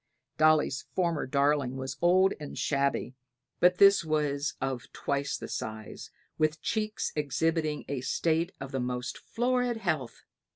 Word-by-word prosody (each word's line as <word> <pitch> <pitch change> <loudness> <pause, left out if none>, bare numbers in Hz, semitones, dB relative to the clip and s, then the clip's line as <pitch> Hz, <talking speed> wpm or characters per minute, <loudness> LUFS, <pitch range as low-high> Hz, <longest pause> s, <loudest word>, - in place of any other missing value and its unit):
Dolly's 155 -3 +3
former 170 -6 0
darling 140 -1 +1
was 130 +1 -4
old 185 +2 +4
and 150 -2 -7
shabby, 140 -3 0 0.5
but 180 0 +5
this 200 -2 +7
was 150 -2 -1
of 130 -2 -4
twice 140 0 -2
the - - -7
size, 110 0 -6
and - - -38
with 155 0 +1
cheeks 215 -1 -2
exhibiting 155 +1 0
a 140 -2 -3
state 165 +6 0
of 135 0 -7
the 135 - -2
most 125 0 -3
florid 245 0 0
health. 155 - -2
150 Hz, 140 wpm, -29 LUFS, 135-175 Hz, 0.5 s, this